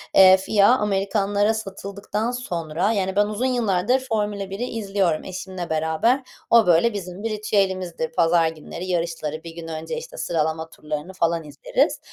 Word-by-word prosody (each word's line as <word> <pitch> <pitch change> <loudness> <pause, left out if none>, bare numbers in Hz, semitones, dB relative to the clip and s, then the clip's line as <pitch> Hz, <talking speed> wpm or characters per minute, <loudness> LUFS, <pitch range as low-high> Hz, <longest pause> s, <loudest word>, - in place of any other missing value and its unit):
eee, 190 0 +9
FIA 200 +1 +3
Amerikanlara 205 0 +1
satıldıktan 200 +1 -4
sonra, 175 -6 -2
yani 190 -3 -1
ben 205 +1 +4
uzun 215 +4 -2
yıllardır 240 -1 +2
Formula 210 -5 -2
1'i 195 +5 -4
izliyorum 195 -8 -1
eşimle 185 -1 -6
beraber. 160 - +1 0.3
O, 230 -3 +6
böyle, 175 +7 +4
bizim 190 0 -6
bir 225 - -1
ritüelimizdir. 190 -6 -1
Pazar 165 0 +3
günleri 160 +3 -7
yarışları, 165 -3 -2
1 165 - -8
gün 165 -1 -7
önce, 160 - -5
işte, - - -8
sıralama 160 0 -1
turlarını 150 +4 -6
falan 170 -2 0
izleriz, 150 -2 0
190 Hz, 150 wpm, -23 LUFS, 165-210 Hz, 0.3 s, eee